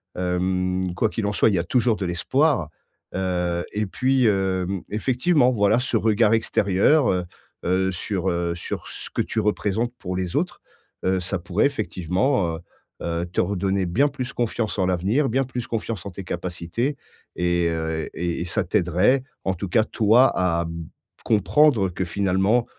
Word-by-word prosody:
Hem, 90 0 -1
quoi 110 +4 +1
qu'il 110 - -3
en 105 - 0
soit, 105 - +4
il 100 - +1
y 85 - +2
a - - 0
toujours 120 +4 +2
de 100 - -3
l'espoir. 110 - +1 0.5
Heu, 90 -2 -1
et 105 +1 -1
puis, 130 +4 +1
hem, 95 -2 0
effectivement, 125 +5 +2
voilà, 110 -1 +3
ce 125 -2 0
regard 110 0 +3
extérieur, 110 +6 +3
heu 90 -1 0 0.4
heu, 95 +1 +1
sur, 95 +1 -2
heu, 85 0 -1
sur 85 - -6
ce - - -8
que - - 0
tu - - -2
représentes 105 +2 0
pour 90 -1 -4
les 90 -2 -3
autres, - - -1 0.4
heu, 95 0 +2
ça 95 +2 -2
pourrait, 90 +8 +1
effectivement, 95 - 0
heu 80 - -8 0.4
heu, 85 0 -2
te - - -2
redonner 95 0 0
bien 120 +12 +2
plus 130 -2 -5
confiance 115 -3 -2
en 95 - +2
l'avenir, 100 - +1
bien 135 +4 +1
plus 125 -2 -5
confiance 110 -4 -3
en 100 - -6
tes 95 +2 -7
capacités 90 - -3 0.4
et 90 -1 +1
heu, 80 -1 -2
et 85 -1 -2
et - - -2
ça 90 +4 0
t'aiderait, 90 +7 +2 0.2
en 95 - 0
tout 95 +1 -5
cas, 110 +5 +3
toi, 115 +4 +4
à, 85 -2 +1
mmh, 85 0 -6 0.4
comprendre 110 0 +3
que 90 +1 -3
finalement, 95 +6 +1
95 Hz, 175 wpm, -23 LUFS, 90-115 Hz, 0.5 s, soit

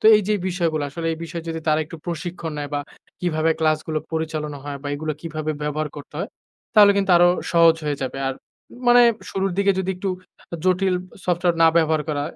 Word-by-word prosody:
তো - - -17
এই 210 - +1
যে 215 - +3
বিষয়গুলা 165 -4 0
আসলে 165 +3 -5
এই 160 - -6
বিষয়ে 165 0 -7
যদি 165 0 -3
তারা 155 0 +3
একটু 165 - -10
প্রশিক্ষণ 170 -1 -4
নেয় 145 -1 -4
বা 145 - 0 0.4
কিভাবে 165 -2 +1
ক্লাসগুলো 155 0 +1
পরিচালনা 155 -2 -3
হয় 145 -1 -5
বা 145 - -4
এগুলো 155 +1 -3
কীভাবে 155 -1 -4
ব্যবহার 150 +1 -2
করতে 145 - -11
হয়, - - -3 0.5
তাহলে 205 -1 +8
কিন্তু 195 -1 +1
আরো 175 +1 +6 0.2
সহজ 165 -1 +6
হয়ে 145 -2 -2
যাবে। 130 +1 -4
আর 135 - -2 0.5
মানে 245 0 +8 0.3
শুরুর 195 -1 -1
দিকে 200 0 +4
যদি 190 0 -1
একটু 190 +1 -2 0.5
জটিল 185 0 +2 0.3
সফটওয়্যার 175 -1 +1
না 165 - +8
ব্যবহার 160 -2 +3
করা। 145 -2 -1
165 Hz, 195 wpm, -22 LUFS, 155-180 Hz, 0.5 s, তাহলে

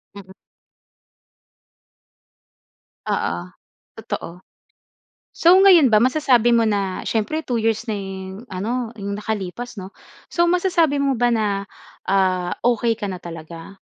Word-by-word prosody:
Mm. 190 -2 -12 2.8
Oo. 85 - -1 0.6
Totoo. 175 +2 -6 0.9
So 350 +3 +5
ngayon 340 -9 +7
ba, 215 - +5
masasabi 250 -1 +3
mo 230 - +4
na 200 -3 -1
siyempre, 225 +8 -1
2 245 -6 -2
years 225 +1 0
na 210 - -1
yung 190 +2 -7
ano 230 +5 -3
'yong 200 0 -4
nakalipas 215 +3 -5
‘no? 185 - -8 0.4
So, 345 0 +2
masasabi 345 -5 +2
mo 275 -3 +1
ba 240 0 +2
na, 205 -3 -1 0.4
ah, 185 -2 +1
okey 235 -1 +2
ka 210 -3 -5
na 185 - -5
talaga? 165 +2 -10
220 Hz, 120 wpm, -21 LUFS, 190-245 Hz, 2.8 s, ngayon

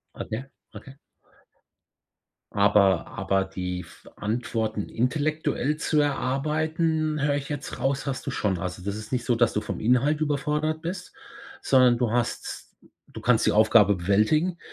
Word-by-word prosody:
Okay, 110 +4 -5 0.3
okay. 135 - -10 1.6
Aber 100 -3 +4
aber 95 0 0
die 90 -1 -4
f 85 - -14
Antworten 110 -1 -2
intellektuell 150 +2 -1
zu 155 -1 +1
erarbeiten, 155 +3 0
höre 145 0 +2
ich 140 -1 -4
jetzt 145 -3 -5
raus, 135 +2 -1
hast 135 -2 -4
du - - -1
schon. 100 -7 -1
Also, 90 +1 -5
das 100 +1 -3
ist 110 0 -8
nicht 125 -2 -1
so, 120 - +2
dass 120 -1 +2
du 105 - 0
vom - - -5
Inhalt 125 +7 +2
überfordert 150 +1 -1
bist, 180 +2 -6 0.5
sondern 125 -2 +5
du 120 -2 0
hast 120 0 -2 0.4
du - - -10
kannst - - +3
die - - +4
Aufgabe 105 -1 +5
bewältigen. 110 - +1
125 Hz, 145 wpm, -25 LUFS, 105-150 Hz, 1.6 s, sondern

